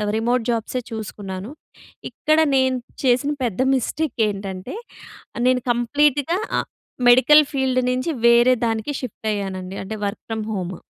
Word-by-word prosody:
Remote 235 Hz, +2 st, +1 dB
జాబ్సే 230 Hz, +2 st, -1 dB
చూసుకున్నాను. 205 Hz, -1 st, -6 dB, 0.6 s
ఇక్కడ 310 Hz, 0 st, +1 dB, 0.2 s
నేను 260 Hz, -1 st, +2 dB, 0.3 s
చేసిన 260 Hz, +3 st, +2 dB
పెద్ద 235 Hz, 0 st, -1 dB
మిస్టేక్ 265 Hz, +2 st, -2 dB
ఏంటంటే? 195 Hz, -, -6 dB, 0.7 s
నేను 255 Hz, -1 st, +3 dB
కంప్లీట్‌గా 285 Hz, -, +1 dB, 0.7 s
మెడికల్ 300 Hz, +5 st, +7 dB
ఫీల్డ్ 260 Hz, -2 st, +1 dB
నుంచి 255 Hz, +6 st, -1 dB, 0.2 s
వేరే 240 Hz, +2 st, +6 dB
దానికి 225 Hz, +4 st, -1 dB
షిఫ్ట్ 230 Hz, -3 st, -7 dB
అయ్యానండి. 190 Hz, -2 st, -4 dB
అంటే 215 Hz, +3 st, -6 dB
వర్క్ 200 Hz, +2 st, -4 dB
ఫ్రమ్ 220 Hz, -1 st, -3 dB
హోమ్. 185 Hz, -2 st, -4 dB
240 Hz, 120 wpm, -21 LUFS, 205-260 Hz, 0.7 s, మెడికల్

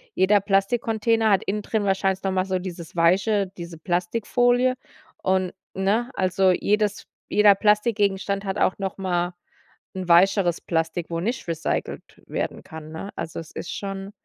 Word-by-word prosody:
jeder 200 Hz, +2 st, +4 dB
Plastikcontainer 220 Hz, +2 st, +1 dB
hat 195 Hz, -2 st, +3 dB
innen 210 Hz, +2 st, -2 dB
drin 215 Hz, 0 st, -1 dB
wahrscheinlich 190 Hz, -1 st, 0 dB
noch 195 Hz, -, 0 dB
mal 185 Hz, -1 st, +1 dB
so 190 Hz, -1 st, -1 dB
dieses 175 Hz, -3 st, -8 dB
weiche 190 Hz, +4 st, +2 dB
diese 170 Hz, -1 st, -8 dB
Plastikfolie, 235 Hz, +9 st, +1 dB, 0.5 s
und, 185 Hz, -1 st, 0 dB, 0.2 s
ne, 210 Hz, +6 st, +1 dB
also, 185 Hz, +1 st, +2 dB
jedes 210 Hz, +2 st, 0 dB, 0.2 s
jeder 210 Hz, -1 st, +6 dB
Plastikgegenstand 205 Hz, -2 st, +1 dB
hat 190 Hz, -1 st, -2 dB
auch -, -, +2 dB
nochmal 185 Hz, -2 st, -2 dB, 0.6 s
'n 185 Hz, -1 st, -4 dB
weicheres 175 Hz, 0 st, +4 dB
Plastik, 165 Hz, 0 st, -2 dB
wo 165 Hz, -, -1 dB
nicht 235 Hz, +4 st, -3 dB
recycelt 165 Hz, -1 st, -4 dB
werden -, -, -4 dB
kann, 160 Hz, -1 st, -10 dB
ne? 180 Hz, +5 st, -7 dB
Also, 165 Hz, -1 st, -5 dB
es 165 Hz, -, -10 dB
ist 175 Hz, -, -6 dB
schon 195 Hz, 0 st, -5 dB
195 Hz, 145 wpm, -24 LUFS, 175-210 Hz, 0.6 s, jeder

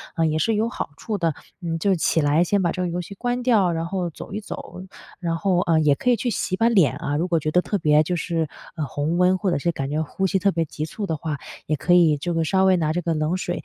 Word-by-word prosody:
啊， 165 Hz, -1 st, +2 dB
也 155 Hz, 0 st, +1 dB
是 215 Hz, +8 st, +1 dB
有 220 Hz, +2 st, +1 dB
好 -, -, -4 dB
处 215 Hz, -3 st, -3 dB
的。 165 Hz, -4 st, 0 dB, 0.3 s
嗯， 165 Hz, -2 st, -3 dB
就 195 Hz, +3 st, +2 dB
起 165 Hz, -1 st, +1 dB
来 145 Hz, +3 st, +3 dB
先 200 Hz, +3 st, +1 dB
把 170 Hz, -2 st, +1 dB
这 185 Hz, -, -3 dB
个 180 Hz, -, 0 dB
游 175 Hz, +1 st, -2 dB
戏 180 Hz, -, -9 dB
关 245 Hz, +3 st, -2 dB
掉， 215 Hz, -8 st, +3 dB
然 165 Hz, 0 st, -2 dB
后 180 Hz, -1 st, -2 dB
走 165 Hz, -, -10 dB
一 210 Hz, -, -2 dB
走， 185 Hz, -, -8 dB, 0.4 s
然 170 Hz, -2 st, -1 dB
后， 185 Hz, 0 st, +1 dB
呃， 165 Hz, -3 st, +2 dB
也 150 Hz, -2 st, +4 dB
可 250 Hz, -, -1 dB
以 245 Hz, -, +5 dB
去 245 Hz, -, -2 dB
洗 195 Hz, -4 st, -1 dB
把 225 Hz, +4 st, +3 dB
脸 185 Hz, -, +3 dB
啊， 145 Hz, -, -3 dB
如 170 Hz, +4 st, 0 dB
果 170 Hz, -2 st, +1 dB
觉 155 Hz, 0 st, -2 dB
得 180 Hz, -, +4 dB
特 205 Hz, -, -1 dB
别 150 Hz, -3 st, +4 dB
就 180 Hz, +3 st, -2 dB
是， 165 Hz, -2 st, -1 dB, 0.3 s
呃， 155 Hz, -3 st, -2 dB
红 145 Hz, +5 st, -2 dB
温， 180 Hz, +1 st, +4 dB
或 190 Hz, -1 st, 0 dB
者 -, -, +1 dB
是 170 Hz, +4 st, 0 dB
感 135 Hz, -4 st, -4 dB
觉 150 Hz, +2 st, -1 dB
呼 190 Hz, +5 st, -1 dB
吸 190 Hz, +1 st, +1 dB
特 200 Hz, +1 st, +2 dB
别 165 Hz, -2 st, 0 dB
急 150 Hz, 0 st, -5 dB
促 200 Hz, +6 st, -5 dB
的 165 Hz, -, -1 dB
话， 150 Hz, -1 st, -4 dB, 0.3 s
也 155 Hz, -, 0 dB
可 175 Hz, +4 st, +1 dB
以 170 Hz, -4 st, +5 dB
就 175 Hz, +4 st, -3 dB
是 165 Hz, 0 st, +1 dB
稍 190 Hz, +4 st, +2 dB
微 190 Hz, -1 st, +5 dB
拿 155 Hz, -2 st, 0 dB
这 175 Hz, -, -1 dB
个 170 Hz, -1 st, -1 dB
冷 155 Hz, +2 st, 0 dB
水 175 Hz, -1 st, -4 dB
175 Hz, 310 characters per minute, -23 LUFS, 155-190 Hz, 0.4 s, 以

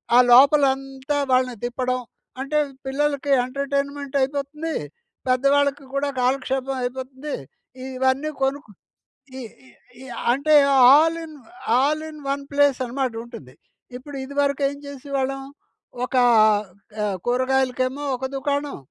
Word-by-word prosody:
ఆ -, -, +8 dB
లోపల 280 Hz, +4 st, +7 dB
అంతా 270 Hz, +1 st, -5 dB
వాళ్ళని 255 Hz, -1 st, +2 dB
తిప్పడం, 255 Hz, +1 st, -2 dB, 0.4 s
అంటే 290 Hz, +3 st, -1 dB, 0.3 s
పిల్లలకి 285 Hz, +1 st, -1 dB, 0.2 s
ఎంటర్టైన్మెంట్ 280 Hz, +1 st, -3 dB
అయిపోతుంది. 290 Hz, +4 st, -3 dB, 0.5 s
పెద్దవాళ్ళకి 275 Hz, +2 st, +2 dB
కూడా 280 Hz, +1 st, 0 dB
కాలక్షేపం 265 Hz, +1 st, 0 dB
అయిపోతుంది. 260 Hz, +3 st, -5 dB, 0.6 s
ఇవన్నీ 265 Hz, +3 st, +1 dB
కొను 270 Hz, +1 st, +1 dB, 0.8 s
ఈ -, -, -6 dB, 0.6 s
ఈ -, -, -10 dB, 0.3 s
అంటే 280 Hz, +5 st, +1 dB, 0.4 s
all 320 Hz, +3 st, +4 dB
in 310 Hz, -2 st, -10 dB, 0.5 s
all 300 Hz, +3 st, +1 dB
in 305 Hz, -, -11 dB
one 280 Hz, 0 st, -2 dB
place 285 Hz, -2 st, +3 dB
అనమాట, 255 Hz, 0 st, -2 dB
ఉంటుంది. 230 Hz, -, -12 dB, 0.4 s
ఇప్పుడు 285 Hz, +3 st, -11 dB
ఇదివరకు 280 Hz, +1 st, -1 dB
ఏం 285 Hz, -, -8 dB
చేసేవాళ్ళం? 275 Hz, -1 st, -3 dB, 0.6 s
ఒక 255 Hz, -, -6 dB, 0.9 s
ఆహ్, 200 Hz, -2 st, -1 dB
కూరగాయలకేమో 255 Hz, +2 st, 0 dB
ఒక 260 Hz, +1 st, -5 dB
దుకాణం. 285 Hz, +1 st, -2 dB
275 Hz, 110 wpm, -23 LUFS, 260-285 Hz, 0.9 s, ఆ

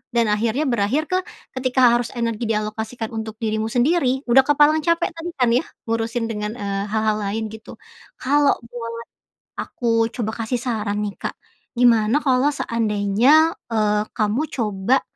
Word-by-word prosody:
Dan 230 Hz, -3 st, +3 dB
akhirnya 225 Hz, +6 st, 0 dB
berakhir 245 Hz, +2 st, +1 dB
ke 370 Hz, -, +3 dB, 0.3 s
ketika 255 Hz, -1 st, +3 dB
harus 240 Hz, 0 st, +1 dB
energi 230 Hz, -1 st, -2 dB
dialokasikan 220 Hz, +1 st, -3 dB
untuk 220 Hz, -1 st, -5 dB
dirimu 220 Hz, -1 st, -2 dB
sendiri, 265 Hz, +2 st, +1 dB
udah 265 Hz, +3 st, +7 dB
kepalang 295 Hz, +1 st, +4 dB
capek 335 Hz, +3 st, +1 dB
tadi 335 Hz, +1 st, -6 dB
kan 250 Hz, -3 st, +2 dB
ya, 250 Hz, +7 st, +2 dB, 0.2 s
ngurusin 230 Hz, +1 st, -1 dB
dengan, 210 Hz, -1 st, -3 dB
eee, 200 Hz, -3 st, -3 dB
hal-hal 215 Hz, 0 st, 0 dB
lain 215 Hz, +2 st, -3 dB
gitu. 220 Hz, 0 st, -11 dB, 0.5 s
Kalo 285 Hz, +2 st, +3 dB
boleh 230 Hz, -1 st, -7 dB, 0.5 s
aku 230 Hz, -2 st, 0 dB
coba 220 Hz, -3 st, -2 dB
kasih 245 Hz, +2 st, -1 dB
saran 215 Hz, -4 st, -2 dB
nih, 205 Hz, -1 st, -3 dB
Kak, -, -, -4 dB, 0.5 s
gimana 230 Hz, +1 st, +4 dB
kalo 265 Hz, +1 st, +2 dB
seandainya, 230 Hz, +7 st, +2 dB, 0.2 s
eee, 210 Hz, -1 st, +2 dB
kamu 215 Hz, +5 st, 0 dB
coba 215 Hz, +2 st, +1 dB
230 Hz, 145 wpm, -21 LUFS, 215-260 Hz, 0.5 s, udah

